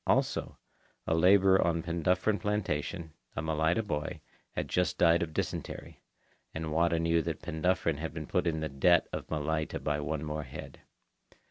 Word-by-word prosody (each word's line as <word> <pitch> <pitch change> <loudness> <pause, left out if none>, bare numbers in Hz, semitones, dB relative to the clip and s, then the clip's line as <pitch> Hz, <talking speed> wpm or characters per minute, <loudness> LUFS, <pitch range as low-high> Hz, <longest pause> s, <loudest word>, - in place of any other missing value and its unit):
Also, - - +1 0.5
a - - +1
labourer 95 +3 +5
on 85 -1 +1
Penduffryn 90 +5 +1
Plantation, 85 -6 -2 0.2
a - - -1
Malaita 80 +6 +1
boy, 75 -7 -3 0.4
had - - -2
just 90 0 0
died 85 +1 +5
of 85 -2 -2
dysentery, - - -4 0.5
and 80 -1 -3
Wada 85 +1 +2
knew 85 0 +2
that - - -4
Penduffryn 80 -1 0
had 80 +1 -3
been 80 0 -6
put 90 +1 0
in 80 -2 0
the 80 - -1
debt 80 +5 +4
of - - -4
Malaita 80 0 -1
by 75 -1 -1
one 75 +1 -2
more 75 0 -3
head. 65 - -9
80 Hz, 160 wpm, -31 LUFS, 80-85 Hz, 0.5 s, labourer